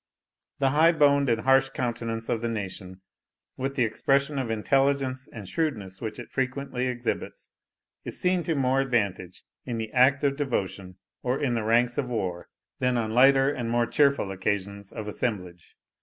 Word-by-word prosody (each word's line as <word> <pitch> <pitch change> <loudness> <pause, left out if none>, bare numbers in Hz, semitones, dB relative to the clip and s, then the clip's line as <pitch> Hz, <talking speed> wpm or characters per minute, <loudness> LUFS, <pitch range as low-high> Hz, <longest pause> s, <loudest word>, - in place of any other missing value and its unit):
The 135 -1 +2
high 160 +4 +5
boned 140 -3 +4
and 115 -1 +1
harsh 135 +1 +4
countenance 115 -2 -3
of 115 - -1
the 120 - -1
nation, 95 -3 -6 0.5
with 135 +1 -3
the 125 - +2
expression 140 +5 +1
of 130 -3 -3
intelligence 135 +3 0
and 105 -5 -9
shrewdness 105 - -3
which 110 -2 -5
it 120 - -9
frequently 130 -1 -2
exhibits, 125 -1 -4 0.5
is - - -3
seen 180 0 +2
to 165 - +2
more 135 -1 +2
advantage 100 -8 -2 0.2
in 120 -2 -4
the 110 -1 -4
act 130 +4 +4
of 140 -1 +1
devotion, 100 -9 -3 0.2
or 125 +2 -1
in 130 -4 0
the 115 - 0
ranks 120 +3 +2
of 130 -3 -2
war, 95 -7 -3 0.3
than 125 -1 +1
on 110 -2 -1
lighter 135 +3 +5
and 120 -5 -3
more 120 0 +2
cheerful 140 -5 +2
occasions 100 +1 -3
of 110 -1 -6
assemblage. 90 -6 -4
125 Hz, 170 wpm, -26 LUFS, 110-135 Hz, 0.5 s, high